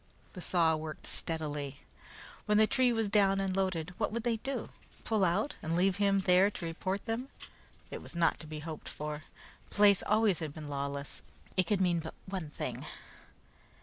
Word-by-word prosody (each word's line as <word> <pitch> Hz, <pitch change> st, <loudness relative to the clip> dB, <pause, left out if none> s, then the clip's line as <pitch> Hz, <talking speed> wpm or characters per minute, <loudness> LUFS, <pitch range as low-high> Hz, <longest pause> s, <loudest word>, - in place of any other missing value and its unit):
The 180 Hz, -, -7 dB
saw 165 Hz, -2 st, +3 dB
worked 155 Hz, 0 st, -6 dB
steadily. 145 Hz, -4 st, -3 dB, 0.7 s
When 210 Hz, 0 st, +4 dB
the 215 Hz, -, +7 dB
tree 250 Hz, +2 st, +3 dB
was 225 Hz, -2 st, +1 dB
down 195 Hz, -1 st, +4 dB
and 190 Hz, -1 st, 0 dB
loaded, 180 Hz, -3 st, -1 dB
what 210 Hz, -, +1 dB
would 230 Hz, +1 st, -2 dB
they 235 Hz, -2 st, +1 dB
do? 270 Hz, +5 st, -4 dB, 0.3 s
Pull 220 Hz, -3 st, +1 dB
out, 190 Hz, +10 st, +2 dB
and 160 Hz, +1 st, -1 dB
leave 185 Hz, +2 st, +3 dB
him 200 Hz, -1 st, +3 dB
there 185 Hz, +1 st, +5 dB
to 195 Hz, -, -6 dB
report 185 Hz, +4 st, -3 dB
them? 240 Hz, +3 st, -2 dB, 0.6 s
It -, -, -5 dB
was -, -, -10 dB
not 170 Hz, -1 st, +2 dB
to 155 Hz, -, -9 dB
be 155 Hz, 0 st, -6 dB
hoped 160 Hz, 0 st, -6 dB
for. 150 Hz, 0 st, -5 dB, 0.4 s
The -, -, -12 dB
place 205 Hz, -2 st, +6 dB
always 210 Hz, -3 st, +3 dB
had 155 Hz, -3 st, -4 dB
been 155 Hz, -2 st, -7 dB
lawless. 140 Hz, 0 st, -4 dB, 0.3 s
It 185 Hz, -2 st, +2 dB
could 200 Hz, 0 st, +2 dB
mean 175 Hz, -2 st, +3 dB
but 160 Hz, 0 st, -7 dB
one 185 Hz, -5 st, -4 dB
thing. -, -, -4 dB
185 Hz, 185 wpm, -32 LUFS, 160-205 Hz, 0.7 s, the